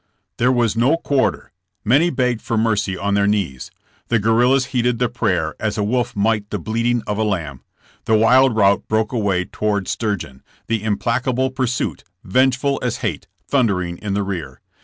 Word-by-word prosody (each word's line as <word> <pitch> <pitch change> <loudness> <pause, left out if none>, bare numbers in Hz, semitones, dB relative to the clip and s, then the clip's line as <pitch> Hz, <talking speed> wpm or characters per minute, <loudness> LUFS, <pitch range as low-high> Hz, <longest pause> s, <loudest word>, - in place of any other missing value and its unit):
There 125 +2 +3
was 120 -4 +1
no 130 +8 +3
quarter. 140 -7 -1 0.3
Many 140 +10 +4
begged 125 -5 0
for 115 -3 -2
mercy 105 -4 0
on 100 +1 -1
their 100 0 +2
knees. 95 -11 -1 0.4
The 115 - +2
guerrillas 120 +5 +3
heeded 125 -1 +1
the 125 +1 +1
prayer 90 -9 -1
as 110 -1 -2
a 105 - 0
wolf 120 +3 -1
might 105 0 0
the 105 - -2
bleating 115 +5 -1
of 105 0 -3
a - - +2
lamb. 85 - -3 0.4
The 110 - +3
wild 125 +2 +4
rout 100 -2 +3
broke 110 0 0
away 100 -6 0
toward 100 -2 -2
Sturgeon, 95 - -3 0.2
the 115 -2 -1
implacable 120 +5 0
pursuit, 130 -2 -2 0.2
vengeful 130 +5 +1
as 125 -2 -1
hate, 100 -2 -3 0.2
thundering 90 -10 0
in 100 -2 -3
the 100 - 0
rear. 80 -10 -5
110 Hz, 170 wpm, -20 LUFS, 100-125 Hz, 0.4 s, Many